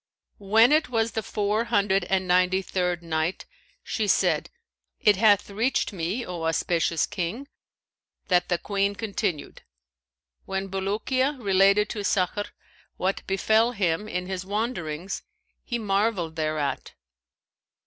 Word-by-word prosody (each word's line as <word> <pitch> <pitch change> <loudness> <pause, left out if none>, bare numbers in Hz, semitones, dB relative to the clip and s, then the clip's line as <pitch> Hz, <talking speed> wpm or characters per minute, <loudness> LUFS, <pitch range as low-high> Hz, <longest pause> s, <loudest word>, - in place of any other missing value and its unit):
When 220 +5 +5
it 310 -1 +3
was 225 -1 0
the 220 - -2
Four 210 +2 -1
Hundred 200 -5 +2
and 190 0 0
Ninety 180 +1 +3
third 180 -2 -1
Night, 160 +2 -2 0.4
She 215 -3 -2
said, 190 - +2 0.5
It 210 -1 +5
hath 205 -1 +4
reached 225 +2 0
me, 190 +7 -2
O 175 -2 -5
auspicious 165 0 +1
King, 205 +11 -4 0.8
that 180 -3 +2
the 175 - +2
Queen 200 +1 -1
continued: 200 -6 -3 0.8
"When 195 0 -3
Bulukiya 220 +9 -1
related 200 0 +4
to 210 -3 -4
Sakhr 200 +1 0 0.5
what 190 +2 -1
befell 220 +5 +2
him 195 -1 0
in 180 -3 -3
his 185 0 -4
wanderings, 195 -5 -3 0.4
he 240 - -2
marvelled 200 -5 0
thereat. 155 -3 -2
195 Hz, 125 wpm, -26 LUFS, 180-215 Hz, 0.8 s, When